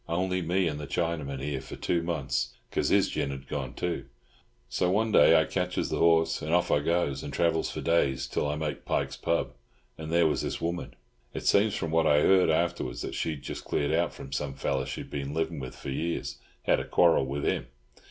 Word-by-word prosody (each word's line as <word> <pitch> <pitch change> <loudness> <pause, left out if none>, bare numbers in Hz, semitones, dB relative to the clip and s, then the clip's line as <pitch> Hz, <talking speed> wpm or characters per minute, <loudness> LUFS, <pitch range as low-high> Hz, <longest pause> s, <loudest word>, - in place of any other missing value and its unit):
Only 90 +2 0
me 90 +2 +1
and 75 -2 -3
the 75 - -6
Chinaman 75 -5 -2
here 70 -2 -2
for 65 - -9
two 85 - 0
months, 75 -7 -2 0.2
'cause - - 0
his - - +4
gin - - -2
had 65 -1 -7
gone 70 -4 -4
too. 90 -1 -2 0.6
So 90 - 0
one 110 +4 +1
day 80 -5 +7
I 80 - +2
ketches 90 -1 -1
the - - -1
horses, 80 -1 +3
and 75 - -3
off 90 0 +2
I - - +4
goes, 75 -3 0
and 70 - -6
travels 85 0 +1
for - - -5
days, 70 -6 +1
till 75 - -1
I 75 - -1
makes 75 -2 -3
Pike's - - -1
pub, - - -1 0.5
and 80 0 -6
there 85 0 +4
was 80 - +1
this - - -3
woman. 85 +1 -3 0.4
"It - - -5
seems 100 +1 +4
from 80 - -3
what 80 -1 +3
I 75 0 +5
heard 95 +2 +5
afterwards 80 -6 0
that - - -4
she'd 75 -4 -3
just - - -6
cleared 70 - -1
out 85 +1 +2
from 70 - -10
some 70 0 -3
fellow - - -1
she'd - - -6
been 70 0 -4
livin' 80 -1 -1
with 65 -1 -7
for 70 - -6
years—had 85 +5 -2
a - - -3
quarrel 85 -6 +4
with 70 +1 -3
him. - - 0
80 Hz, 215 wpm, -28 LUFS, 70-85 Hz, 0.6 s, day